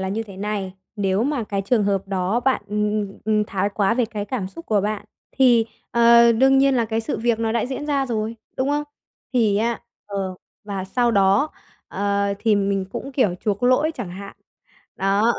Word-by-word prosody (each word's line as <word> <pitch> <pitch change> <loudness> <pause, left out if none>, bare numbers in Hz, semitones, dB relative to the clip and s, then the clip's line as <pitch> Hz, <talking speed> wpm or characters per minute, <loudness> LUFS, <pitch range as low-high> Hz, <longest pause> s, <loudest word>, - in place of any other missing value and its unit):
là 190 - -2
như 210 +4 -2
thế 200 -4 -12
này, 200 -1 -3 0.2
nếu 195 0 +1
mà 270 -2 -1
cái 200 -1 -2
trường 215 +1 +2
hợp 195 -1 -1
đó 195 +4 0
bạn, 260 -2 +1
ừm, 210 0 0 0.2
ừm, 195 - -14
ừm, 215 0 +2
thái 200 -1 -1
quá 200 +1 +2
về 245 0 +2
cái 215 -2 -5
cảm 205 -3 -3
xúc 335 - -11
của 210 -2 +2
bạn, 210 0 -2 0.3
thì, 240 -4 +5 0.2
ờ, 235 0 +6
đương 265 +4 +4
nhiên 275 0 +4
là 235 - +2
cái 225 0 -1
sự 225 - -3
việc 235 0 +1
nó 225 -1 0
đã 235 0 0
diễn 275 +3 -5
ra 280 -2 +1
rồi, 225 -1 -2 0.2
đúng 260 +2 0
không? 295 +1 0 0.5
Thì 220 -5 +3
á 230 +2 0 0.3
ờ, 195 -2 -3 0.3
và 200 -2 -4
sau 240 +5 +1
đó, 200 +7 +3 0.4
ờ, 200 0 0
thì 220 0 +2
mình 195 -1 0
cũng 275 - -5
kiểu 240 -9 +2
chuộc 205 0 -2
lỗi 255 +6 +3
chẳng 185 - -6
hạn. 200 +2 -9 0.6
Đó. 200 +4 +2
215 Hz, 205 wpm, -22 LUFS, 200-240 Hz, 0.6 s, ờ